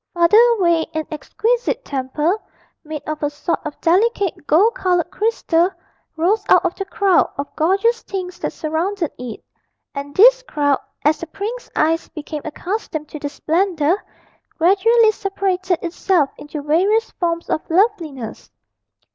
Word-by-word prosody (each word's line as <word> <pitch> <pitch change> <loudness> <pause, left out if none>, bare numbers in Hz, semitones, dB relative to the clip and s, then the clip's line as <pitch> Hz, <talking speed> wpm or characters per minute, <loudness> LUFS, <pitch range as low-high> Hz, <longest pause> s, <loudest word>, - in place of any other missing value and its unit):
Farther 345 +5 +5 0.2
away, 340 -4 +2
an 315 0 -1
exquisite 460 +10 -1
temple, 285 +6 -1 0.5
made 305 -2 -6
of 310 0 -4
a 290 - +1
sort 295 +3 -2
of 295 - -7
delicate 385 -2 +1
gold 400 +10 +4
coloured 360 -7 0
crystal, 365 -6 +1 0.5
rose 390 +6 +2
out 365 0 +5
of 355 - +1
the 390 - -5
crowd 395 -2 +2
of 280 +1 -5
gorgeous 400 +9 +2
things 365 -2 -6
that - - -2
surrounded 330 +2 -2
it, 245 -3 -7 0.5
and 285 0 -6
this - - +7
crowd, 290 - 0 0.3
as 305 +1 +3
the 335 - -6
prince's 435 +9 -6
eyes 325 +2 +1
became 305 -1 -6
accustomed 315 -1 -4
to 305 - -7
the 290 - -4
splendour, 335 +3 0 0.5
gradually 435 +6 +4
separated 385 -3 -1
itself 345 -3 +1
into 295 0 -7
various 385 +10 +2
forms 335 -1 -2
of 315 - 0
loveliness. 330 - -1
345 Hz, 140 wpm, -20 LUFS, 305-400 Hz, 0.5 s, this